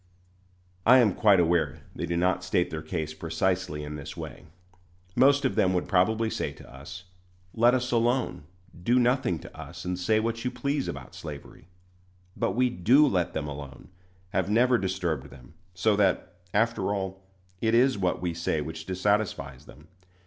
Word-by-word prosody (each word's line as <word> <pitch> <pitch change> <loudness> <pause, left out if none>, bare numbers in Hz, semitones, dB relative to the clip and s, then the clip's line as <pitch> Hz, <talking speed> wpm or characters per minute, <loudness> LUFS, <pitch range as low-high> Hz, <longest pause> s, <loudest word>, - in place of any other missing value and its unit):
I 125 +6 +7
am 115 -6 +4
quite 100 -3 +4
aware 85 -1 +1
they 85 - -3
do 85 0 -1
not 90 +1 +1
state 90 -1 0
their 80 0 -4
case 80 -1 -4
precisely 80 0 -1
in 75 0 -6
this 70 - -8
way. - - -8 0.7
Most 140 +3 +4
of 130 - +1
them 95 0 +2
would 90 - -1
probably 110 +4 +2
say - - -3
to - - -15
us, 90 +8 -9 0.5
"Let 120 +2 +4
us 125 0 -1
alone; 120 - 0 0.4
do 120 +7 +2
nothing 125 -7 +2
to - - -12
us, - - -9
and 90 0 -2
say 110 +4 +2
what 115 +1 -2
you 125 - 0
please 140 +2 -2
about - - -7
slavery." 75 -1 -10 0.7
But - - 0
we 125 +1 +3
do 125 - +5
let 90 - 0
them 75 -1 -3
alone, 70 0 -9 0.4
have 95 - -1
never 120 +3 +4
disturbed 90 -7 -2
them, 65 -3 -15 0.2
so 100 +4 +2
that, 95 -3 +1 0.2
after 105 -2 +1
all, 95 -1 -3 0.4
it 115 0 +2
is 130 +2 +4
what 90 -2 -1
we 85 -2 -1
say 85 -1 -1
which 80 +1 -6
dissatisfies 95 -8 -1
them. 75 +1 -15
95 Hz, 170 wpm, -27 LUFS, 80-115 Hz, 0.7 s, I